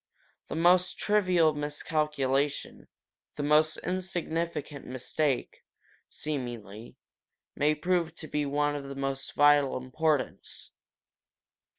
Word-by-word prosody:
The - - -5
most 180 +2 +4
trivial 185 -6 +3
miscalculation, 145 -1 -1 0.5
the 145 - -3
most 155 +1 +4
insignificant 170 -5 -3
mistake, 130 +2 -2 0.5
seemingly, 120 -7 -5 0.6
may 150 +1 +2
prove 170 +1 0
to 155 - -7
be 150 - -1
of 145 0 0
the 140 - -6
most 135 0 -3
vital 145 -1 +5
importance. 145 +2 -2
150 Hz, 90 wpm, -29 LUFS, 140-160 Hz, 0.6 s, vital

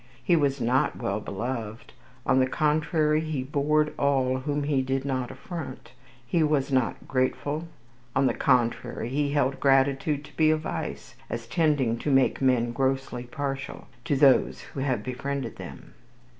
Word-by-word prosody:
He 175 - +4
was 140 -3 +1
not 125 +4 +1
well 105 -3 -2
beloved. 110 +1 -5 0.3
On 130 - +3
the 130 - +3
contrary, 150 +1 +1
he 155 -4 -3
bored 150 +2 +1
all 135 -2 +2
whom 145 +2 -2
he 140 -2 +1
did 135 +1 -2
not 130 -3 -1
affront. 140 -9 -8 0.3
He 165 +7 +1
was 150 -3 +1
not 130 -3 0
grateful. 145 +4 -1 0.5
On 135 - +3
the - - +3
contrary, 120 -2 +1
he 145 +2 0
held 140 -2 +1
gratitude 140 +2 +2
to - - -16
be 155 -1 +4
a 155 - +3
vice, 155 - -5 0.2
as 115 0 -4
tending 135 -5 +1
to 150 - -2
make 135 -1 +3
men 125 -3 +2
"grossly 130 -1 -1
partial" 140 +2 -5 0.2
to 145 - +1
those 135 -1 +4
who - - -9
have 130 -5 -1
befriended 130 -1 -4
them. - - -10
135 Hz, 155 wpm, -26 LUFS, 130-150 Hz, 0.5 s, He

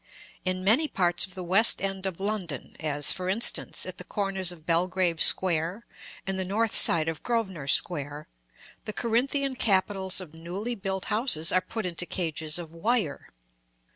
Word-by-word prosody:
In 185 0 -2
many 235 +11 +3
parts 175 -7 +1
of 185 - -16
the 185 - -6
west 195 +6 +5
end 195 -1 -3
of 185 -2 -6
London, 190 - -4
as, 145 -2 +2
for 185 -1 -4
instance, 225 +5 +3
at - - -7
the - - -5
corners 195 -3 -3
of 160 -3 -13
Belgrave 175 0 0
Square, 180 +4 +3 0.4
and 195 0 -3
the - - -1
north 215 +4 -1
side 160 -1 +5
of 165 -1 -4
Grosvenor 190 - -3
Square, 145 0 +1 0.6
the 215 - -4
Corinthian 265 +5 -1
capitals 195 -4 +1
of 175 -5 -8
newly 180 +8 -6
built 190 -3 -5
houses 205 - +2
are 185 - +2
put 220 +1 -6
into 180 0 -4
cages 160 -3 -2
of 170 -3 -8
wire. 170 -2 -2
185 Hz, 165 wpm, -26 LUFS, 165-205 Hz, 0.6 s, west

